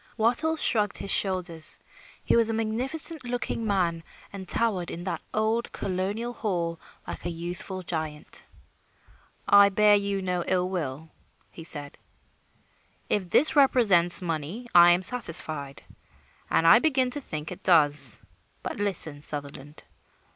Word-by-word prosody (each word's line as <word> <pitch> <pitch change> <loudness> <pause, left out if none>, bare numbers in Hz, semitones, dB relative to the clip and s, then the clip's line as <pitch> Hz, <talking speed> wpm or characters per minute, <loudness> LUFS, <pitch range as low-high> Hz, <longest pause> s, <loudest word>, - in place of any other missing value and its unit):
Wattles 275 +9 +1
shrugged 210 -3 +1
his 200 - -3
shoulders. 180 -5 0 0.5
He - - +1
was 230 -1 +2
a 225 - -2
magnificent 255 +9 0
looking 240 -2 -4
man 175 -5 -1 0.3
and 190 -2 -9
towered 195 -5 -1
in 170 - -7
that 185 - -4
old 220 +2 -1
colonial 200 +6 -4
hall 170 -7 -3 0.3
like - - -8
a 175 - -3
youthful 175 +2 -6
giant. 155 -3 -5 1.0
"I 200 0 +6
bear 210 +1 +3
you 200 -1 -2
no 180 -1 -2
ill 180 -1 0
will," 160 -3 -5 0.5
said 145 -3 -1 1.1
he. - - +2
"If 185 -3 -9
this 305 - +5
represents 205 -12 +5
money, 170 +8 -5
I 175 0 +7
am 175 +2 +2
satisfied, 160 - 0 0.7
and 165 - +1
I 165 +6 +7
begin 260 -4 +1
to 290 - +1
think 155 - -7
it 180 +2 -9
does. 150 -5 +2 0.4
But - - -5
listen, 180 -8 0
Sutherland. 145 0 -2
185 Hz, 135 wpm, -25 LUFS, 165-225 Hz, 1.1 s, I